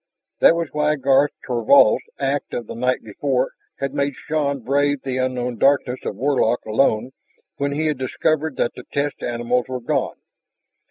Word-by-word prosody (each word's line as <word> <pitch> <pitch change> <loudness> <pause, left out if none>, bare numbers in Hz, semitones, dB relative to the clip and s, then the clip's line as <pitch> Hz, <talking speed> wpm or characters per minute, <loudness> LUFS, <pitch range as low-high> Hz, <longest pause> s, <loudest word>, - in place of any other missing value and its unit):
That 165 - +6
was 170 -3 -2
why 150 0 +1
Garth 140 +1 +3 0.2
Thorvald's 125 0 +4
act 140 +1 -2
of 120 - -3
the - - -7
night 125 +2 -1
before - - -1 0.3
had 135 - -3
made 140 -1 -1
Shann 140 -3 -2
brave 140 +3 +1
the 130 -1 -2
unknown 125 -2 -2
darkness 135 -2 +2
of - - -3
Warlock 130 -4 +1
alone 110 +2 +1 0.5
when 140 0 -1
he 155 +2 -1
had 150 -4 0
discovered 155 +3 0
that - - 0
the - - -11
test 145 0 -2
animals 120 +1 -1
were 130 -1 -4
gone. 120 - -1
135 Hz, 165 wpm, -21 LUFS, 125-145 Hz, 0.5 s, That